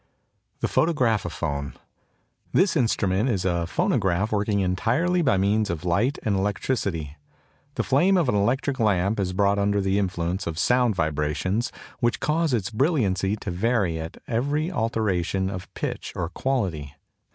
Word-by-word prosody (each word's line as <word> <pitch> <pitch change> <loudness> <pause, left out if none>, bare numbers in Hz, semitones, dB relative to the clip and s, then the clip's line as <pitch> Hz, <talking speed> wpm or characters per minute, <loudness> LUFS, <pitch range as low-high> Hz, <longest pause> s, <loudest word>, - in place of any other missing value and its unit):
THE - - +1
PHOTOGRAPHOPHONE. 85 - 0 0.8
This 190 0 +3
instrument 110 - +1
is 100 -6 -1
a 85 -2 0
phonograph 95 +4 +1
working 105 -1 +1
entirely 120 - +1
by 135 - +3
means 100 +2 +1
of 85 0 -4
light 105 +11 +1
and 105 -3 +1
electricity. 95 - -2 0.6
The - - 0
flame 175 +9 +3
of 170 -6 +2
an 125 - +2
electric 130 +7 0
lamp 105 -1 +2
is 95 -2 0
brought 100 +2 +2
under 100 0 +1
the 95 0 +1
influence 90 -2 -2
of 80 -2 -4
sound 125 +2 +2
vibrations 80 +7 -1 0.3
which 120 0 +1
cause 160 0 +1
its 110 -4 -1
brilliancy 110 - +1
to 100 -3 -5
vary 95 -3 0
at 80 +1 -7
every 145 +8 0
alteration 100 - 0
of 90 -2 -7
pitch - - -4
or 85 - -2
quality. 90 - -2
100 Hz, 145 wpm, -25 LUFS, 90-120 Hz, 0.8 s, This